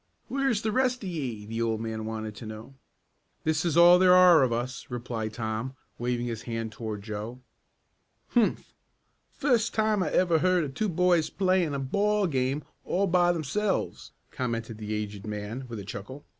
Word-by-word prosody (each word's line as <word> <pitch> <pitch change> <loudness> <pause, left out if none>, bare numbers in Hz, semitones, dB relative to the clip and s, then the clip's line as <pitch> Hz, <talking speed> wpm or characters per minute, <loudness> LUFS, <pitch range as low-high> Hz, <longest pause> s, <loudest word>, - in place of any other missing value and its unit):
"Where's 270 -6 0
the 220 - 0
rest 255 0 +1
of 190 - -3
ye?" 125 -11 -4
the 115 +2 -4
old 115 -1 0
man 110 -1 -4
wanted 110 -1 -5
to 115 - -8
know. 110 +5 -9 0.7
"This 160 0 +1
is 170 -2 0
all 175 +1 +8
there 180 -1 +6
are 180 -3 +7
of 130 -2 +2
us," 120 +2 -3
replied 120 -3 -4
Tom, 110 +3 -3 0.2
waving 120 0 -1
his 115 -2 -4
hand 115 -2 -4
toward 110 -2 -6
Joe. 110 +3 -6 0.9
"Humph! 235 -3 +1 0.6
Fust 240 -5 +1
time 215 -2 +2
I - - 0
ever 170 -3 +3
heard 185 0 +3
of 140 -3 -5
two 215 +8 -1
boys 175 -2 +2
playin' 185 -6 +1
a - - -2
ball 205 +9 +1
game 135 -2 0 0.2
all 195 +3 +1
by 175 -1 +3
themselves," 175 +5 -2 0.2
commented 115 -3 -3
the 105 -1 -5
aged 105 -1 -5
man 105 +5 -5
with 115 -2 -6
a 100 - -7
chuckle. 105 +8 -8
130 Hz, 175 wpm, -27 LUFS, 110-180 Hz, 0.9 s, all